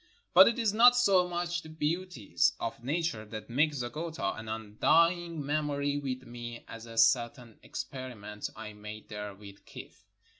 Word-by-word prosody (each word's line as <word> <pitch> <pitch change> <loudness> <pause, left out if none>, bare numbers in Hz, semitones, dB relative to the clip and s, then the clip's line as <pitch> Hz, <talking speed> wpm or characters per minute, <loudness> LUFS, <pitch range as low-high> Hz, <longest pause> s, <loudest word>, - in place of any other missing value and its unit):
But - - +9
it 235 - +1
is 225 -4 +1
not 245 +3 +7
so 195 -7 +4
much 175 0 -2
the 160 - -12
beauties 155 - 0
of 115 0 -5
nature 155 -4 -1
that 110 +2 -8
make 150 +5 +3
Zeggota 150 +6 -3
an 110 - -9
undying 160 +9 +1
memory 145 -1 0
with 130 -2 -4
me 120 -1 -8
as 115 0 -9
a 115 0 -10
certain 120 -1 +2
ex - - -4
periment 115 -6 -7
I 110 -1 -8
made 105 +1 -10
there 105 -2 -6
with 100 0 -13
kijff. - - -12
130 Hz, 160 wpm, -30 LUFS, 110-170 Hz, -, But